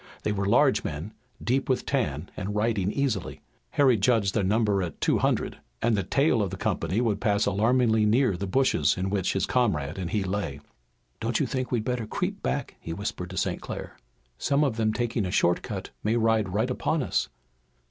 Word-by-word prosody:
They 105 - 0
were 100 -1 -1
large 130 +6 +4
men, 80 +8 -5 0.3
deep 130 +3 0
with 130 - +1
tan 95 - -1
and 100 +1 -4
riding 105 -3 +1
easily. 125 -9 -2 0.3
Harry 130 -5 +4
judged 100 -2 +2
their 105 - +1
number 105 0 +2
at 85 -4 -5
two - - +2
hundred, - - 0 0.2
and 120 - +2
the 100 - +1
tail 125 - +2
of 100 - 0
the 95 - -6
company 85 +6 -1
would 115 -4 0
pass 105 -3 +2
alarmingly 110 +1 +3
near 115 -2 +3
the 95 +3 -4
bushes 95 - +2
in 95 +1 -2
which 95 -3 0
his 95 - +1
comrade 90 - 0
and 90 -2 -3
he 105 -2 0
lay. 95 -7 -3 0.6
"Don't 115 0 0
you - - +2
think 130 -2 -3
we'd 115 -3 0
better 125 -3 -2
creep - - -3
back?" - - -2
he 80 - -6
whispered 90 -1 -4
to 95 - -7
St. - - -1
Clair. - - -7 0.4
"Some 140 +2 +2
of 135 -6 +1
them 110 -1 +1
taking 120 -1 -1
a 90 - -2
short 90 0 +2
cut - - -6
may 110 +2 +1
ride 110 -3 +2
right 110 +7 0
upon 155 +3 0
us." - - 0
105 Hz, 200 wpm, -27 LUFS, 95-120 Hz, 0.6 s, large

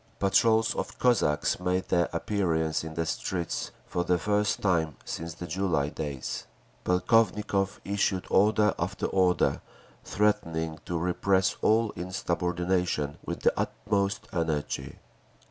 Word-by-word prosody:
Patrols 110 +3 +3
of - - -4
Cossacks 105 -15 +2
made 90 +1 -1
their 85 0 +2
appearance 85 -4 0
in 80 0 -7
the 80 0 -1
streets, 85 +1 -2 0.2
for 90 - -2
the 90 0 +2
first 105 +3 +1
time 80 -6 +1
since 85 0 -5
the 90 - -6
July 85 -5 0
days. 70 -4 -5 0.4
Polkovnikov 100 0 +2
issued 95 -1 0
order 105 +1 +4
after 90 +3 -2
order, 90 -2 +2 0.4
threatening 80 -6 0
to 85 - -2
repress 95 +2 +1
all 110 0 +3
insubordination 90 -3 -1
with - - -5
the - - +3
"utmost 100 -1 -1
energy." 75 -5 -2
90 Hz, 120 wpm, -28 LUFS, 80-100 Hz, 0.4 s, order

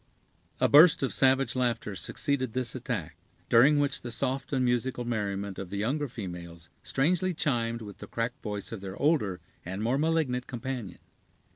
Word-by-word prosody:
A - - +4
burst 150 +1 +7
of 135 - 0
savage 135 0 +3
laughter 120 -5 -1
succeeded 130 +1 -1
this 125 -2 -1
attack, 110 - -4 0.3
during 135 +5 +6
which 145 -1 0
the 120 - -6
soft 130 +3 -1
and 130 -3 +1
musical 125 0 0
merriment 100 -4 -3
of 95 -2 -6
the 100 - -4
younger 140 +8 0
females 85 -8 -8
strangely 175 +6 +1
chimed 115 -6 -1
with 100 -2 -10
the - - -8
cracked 120 +4 -3
voice 105 -2 -5
of 110 -4 -6
their 95 0 -7
older 130 - +1 0.2
and 95 +4 -4
more 125 +5 +1
malignant 150 -6 0
companion. 125 -6 -5
120 Hz, 165 wpm, -29 LUFS, 105-135 Hz, 0.3 s, burst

